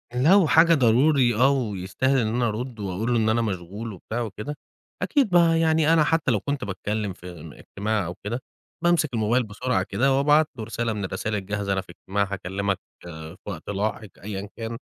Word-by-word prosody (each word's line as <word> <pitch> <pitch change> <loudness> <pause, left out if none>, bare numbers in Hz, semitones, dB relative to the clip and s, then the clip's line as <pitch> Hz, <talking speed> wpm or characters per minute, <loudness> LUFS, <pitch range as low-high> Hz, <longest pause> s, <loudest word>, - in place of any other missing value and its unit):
لو 165 +7 +5
حاجة 165 +2 +6
ضروري 130 -1 +4
آه 130 +4 +5
ويستاهل 120 +1 0
إن 115 -4 +1
أنا 120 +2 +1
أرد 115 +2 -4
وأقول 100 +4 -2
له - - +3
إن 110 - +2
أنا 115 +2 +2
مشغول 105 +2 -4
وبتاع 110 +6 -5
وكده. 110 +6 -5 0.5
أكيد 275 -7 +2
بقى 170 -2 +4
يعني 160 -1 +3
أنا 160 -2 +5
حتى 155 -3 +1
لو 110 - +2
كنت 140 +6 -3
باتكلم 105 +1 -3
في 90 0 -11
ام 80 -2 -10
اجتماع 105 +4 -3
أو 85 +2 -5
كده 115 +5 -3 0.4
بامسك 170 -5 +2
الموبايل 115 +3 +2
بسرعة 110 -1 -1
كده 135 +8 +1
وأبعت 150 +2 +4
له 110 - -4
رسالة 115 +1 -2
من 105 -2 -4
الرسايل 100 +3 -3
الجاهزة 100 0 -2
أنا 95 - 0
في - - -22
إجتماع 100 +3 -2
هاكلمك 95 +1 -2 0.2
في 80 0 -9
وقت 100 -4 -7
لاحق 105 +1 -2
أيًا 100 -1 -5
كان. 115 0 -5
110 Hz, 190 wpm, -24 LUFS, 100-135 Hz, 0.5 s, حاجة